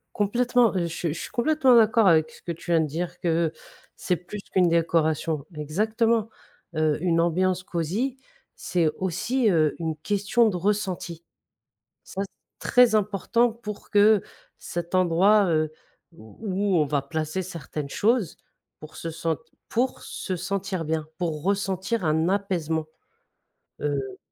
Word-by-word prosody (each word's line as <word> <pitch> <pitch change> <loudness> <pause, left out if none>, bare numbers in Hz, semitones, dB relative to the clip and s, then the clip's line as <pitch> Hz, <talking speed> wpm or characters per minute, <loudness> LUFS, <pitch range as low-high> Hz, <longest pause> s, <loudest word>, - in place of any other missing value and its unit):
Complètement, 240 +3 +2
je 175 -2 +1
suis 165 -1 -3
je - - -6
suis - - -6
complètement 265 0 +4
d'accord 225 -1 +5
avec 160 -2 +4
ce - - -17
que 170 - -3
tu 170 +1 -9
viens 165 -1 +4
de 160 - +1
dire, 175 +4 -4
que 165 -2 +1 0.4
c'est 180 - 0
plus 180 +5 -8
qu'une 180 -2 +4
décoration. 160 -2 +1
Exactement, 220 +9 0 0.5
heu, 155 -1 +1
une 170 -2 +2
ambiance 185 +2 +1
cosy 190 - -2 0.4
c'est 170 -3 +1
aussi, 225 +7 0
heu, 155 -5 +2
une 160 -2 -2
question 205 +5 +2
de 195 - -2
ressenti. 185 -3 -2 0.8
Ça 195 - -5 0.4
très 245 -3 +4
important 215 +3 +1
pour 215 -3 -8
que 210 0 +5 0.4
cet 175 +1 -3
endroit, 185 +4 +4
heu, 155 -1 +1 0.4
où 190 - -2
on 155 - +4
va 145 0 0
placer 155 +5 -3
certaines 155 -4 -6
choses, 215 - +1 0.4
pour 155 0 -11
se 165 - -5
sente 160 -1 -2 0.3
pour 250 +3 0
se 185 - -4
sentir 190 0 -3
bien, 155 0 -2
pour 160 -4 -2
ressentir 195 +1 -1
un 160 +2 +2
apaisement, 170 -5 -1 1.0
heu 135 -3 -2
180 Hz, 140 wpm, -25 LUFS, 160-210 Hz, 1.0 s, d'accord